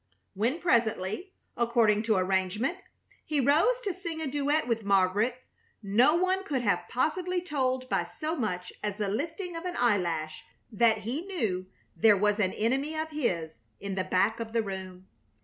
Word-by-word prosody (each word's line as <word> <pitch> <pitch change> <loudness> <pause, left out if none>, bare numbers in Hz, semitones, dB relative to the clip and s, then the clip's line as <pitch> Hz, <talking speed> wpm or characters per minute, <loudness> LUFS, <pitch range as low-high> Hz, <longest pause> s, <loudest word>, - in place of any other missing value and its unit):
When, 235 - 0
presently, 235 - 0 0.2
according 230 -3 +3
to 215 - +5
arrangement, 190 - 0 0.4
he 300 -2 -1
rose 305 - +4
to 395 - -1
sing 340 -4 -6
a 320 - -3
duet 290 +1 0
with 230 -2 0
Margaret, 200 +4 +2 0.5
no 235 +10 +4
one 370 +2 +1
could 275 -9 -2
have 180 -5 +1
possibly 360 +7 0
told 260 -7 -1
by - - 0
so 315 +2 -4
much 180 - -3
as 205 -1 -3
the 210 -2 -1
lifting 330 - -3
of 330 - -5
an 360 -1 -4
eyelash 175 -9 0 0.3
that 230 0 +3
he 275 - -4
knew 205 - -2 0.3
there 210 -2 +5
was 210 +2 +2
an 190 -3 +1
enemy 270 +8 0
of 315 0 -2
his 185 - -1 0.3
in 200 -1 -4
the 185 -1 -1
back 190 +5 +1
of 225 -1 -5
the 230 -1 +2
room. 190 -2 -7
235 Hz, 165 wpm, -29 LUFS, 200-310 Hz, 0.5 s, to